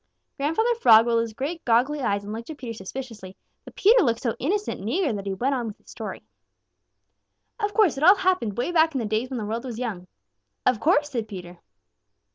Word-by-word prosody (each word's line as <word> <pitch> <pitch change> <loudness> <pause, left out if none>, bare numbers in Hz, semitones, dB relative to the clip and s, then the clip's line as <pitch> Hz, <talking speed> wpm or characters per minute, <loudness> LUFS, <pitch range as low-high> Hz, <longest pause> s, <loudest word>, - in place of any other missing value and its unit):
Grandfather 325 +12 +1
Frog 230 - +6
rolled 230 -1 +2
his 230 -1 -4
great, 295 +8 -4
goggly 255 +5 +2
eyes 200 -5 0
and 205 +1 -6
looked 230 +4 -7
at 310 - -7
Peter 240 -5 -6
suspiciously, 215 -2 -8 0.3
but - - -13
Peter 450 +4 +5
looked 230 -4 0
so 230 -3 0
innocent 405 +9 -1
and 200 - -5
eager 315 - 0
that 200 -1 -5
he 195 - -1
went 260 +7 0
on 245 -3 -2
with 215 - -7
his - - -17
story. - - -7 1.4
"Of 415 -1 -2
course, 410 -11 +3
it - - -3
all 370 +5 +8
happened 365 - 0
way 250 +8 -1
back 320 -3 +3
in - - +1
the 230 - -2
days 220 +4 -1
when 260 - -4
the 215 - -3
world 225 +3 -3
was 245 -4 -6
young." 210 -8 -5 0.6
"Of 250 -4 +3
course!" 295 0 +2
said 230 -4 -3
Peter. 180 -4 -9
245 Hz, 220 wpm, -24 LUFS, 220-310 Hz, 1.4 s, all